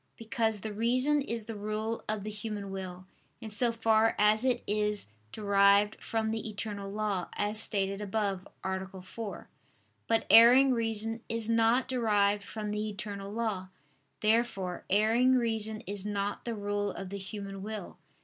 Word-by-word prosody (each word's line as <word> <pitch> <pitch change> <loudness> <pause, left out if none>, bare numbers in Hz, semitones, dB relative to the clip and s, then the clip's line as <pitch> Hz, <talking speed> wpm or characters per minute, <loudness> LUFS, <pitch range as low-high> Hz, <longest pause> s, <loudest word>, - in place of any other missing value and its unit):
Because 220 -2 -1
the 215 0 -5
reason 255 +7 +2
is 230 -5 -4
the 225 - -6
rule 215 +2 -3
of 215 -2 -1
the 215 - -4
human 210 -2 -5
will, 185 -1 -6 0.3
in 220 - -7
so 235 +3 +3
far 225 -1 +3
as 210 +2 +4
it 250 -2 +1
is 210 - -1 0.2
derived 200 0 +3
from 220 -1 -1
the 220 0 -3
eternal 205 -2 -5
law, 205 -4 -2
as 210 +1 0
stated 195 -2 0
above 200 -2 -2 0.2
(A. 190 0 -4
4). 210 +2 -7 0.6
But 225 -1 +2
erring 255 +4 +8
reason 225 -1 -1
is 230 0 -1
not 230 +3 +3
derived 210 -5 +2
from 210 +1 -5
the 210 +1 -2
eternal 200 -1 -6
law. 210 -4 -2 0.5
Therefore 215 -5 0
erring 225 +6 +4
reason 220 -3 +1
is 200 -3 -5
not 205 -1 -3
the 235 -1 -3
rule 205 0 -2
of 195 - -6
the 200 - -4
human 195 0 -7
will. 210 -2 -7
215 Hz, 155 wpm, -30 LUFS, 200-225 Hz, 0.6 s, erring